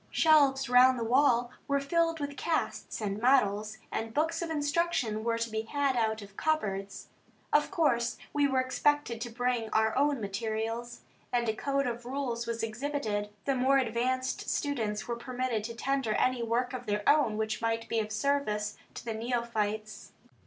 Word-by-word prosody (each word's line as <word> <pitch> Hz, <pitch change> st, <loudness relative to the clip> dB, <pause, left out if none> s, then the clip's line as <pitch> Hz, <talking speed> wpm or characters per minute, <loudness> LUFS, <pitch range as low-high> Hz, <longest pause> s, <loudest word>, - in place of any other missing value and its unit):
Shelves 285 Hz, -4 st, +4 dB
round 250 Hz, +1 st, +6 dB
the 235 Hz, -, -2 dB
wall 245 Hz, 0 st, +3 dB, 0.2 s
were 280 Hz, -1 st, +2 dB
filled 330 Hz, +3 st, +1 dB
with 285 Hz, -1 st, -4 dB
casts 325 Hz, -7 st, -2 dB
and 205 Hz, 0 st, -2 dB
models, 215 Hz, -4 st, +2 dB
and 225 Hz, 0 st, -4 dB
books 325 Hz, +2 st, +1 dB
of 340 Hz, -, -3 dB
instruction 290 Hz, -7 st, 0 dB
were 230 Hz, 0 st, 0 dB
to 230 Hz, 0 st, -1 dB
be 220 Hz, -1 st, -2 dB
had 275 Hz, +3 st, 0 dB
out 220 Hz, -2 st, 0 dB
of 200 Hz, 0 st, -14 dB
cupboards. 200 Hz, -11 st, -2 dB, 0.4 s
Of 295 Hz, -, +4 dB
course 240 Hz, -7 st, +1 dB, 0.2 s
we 290 Hz, -1 st, +3 dB
were 265 Hz, -1 st, +1 dB
expected 255 Hz, -2 st, 0 dB
to 240 Hz, -, -3 dB
bring 245 Hz, -1 st, -1 dB
our 220 Hz, 0 st, +2 dB
own 285 Hz, 0 st, +2 dB
materials, 225 Hz, +3 st, -3 dB, 0.3 s
and 240 Hz, -1 st, +1 dB
a 220 Hz, -, +2 dB
code 275 Hz, +4 st, -1 dB
of 240 Hz, -1 st, -3 dB
rules 245 Hz, -2 st, -3 dB
was 230 Hz, -1 st, -2 dB
exhibited. 220 Hz, -3 st, -2 dB, 0.2 s
The 275 Hz, -, +2 dB
more 265 Hz, +1 st, +3 dB
advanced 255 Hz, +1 st, -1 dB
students 225 Hz, -8 st, -1 dB
were 235 Hz, -1 st, -2 dB
permitted 245 Hz, -2 st, -2 dB
to 230 Hz, 0 st, -6 dB
tender 270 Hz, -2 st, 0 dB
any 255 Hz, -1 st, +1 dB
work 240 Hz, +2 st, 0 dB
of 250 Hz, -2 st, -6 dB
their 210 Hz, 0 st, -1 dB
own 285 Hz, -8 st, +4 dB
which 220 Hz, 0 st, -2 dB
might 225 Hz, 0 st, -1 dB
be 230 Hz, -, 0 dB
of 215 Hz, -1 st, -3 dB
service 215 Hz, -3 st, 0 dB, 0.2 s
to -, -, -8 dB
the 230 Hz, -, -2 dB
neophytes. 220 Hz, -3 st, -3 dB
240 Hz, 175 wpm, -30 LUFS, 220-275 Hz, 0.4 s, round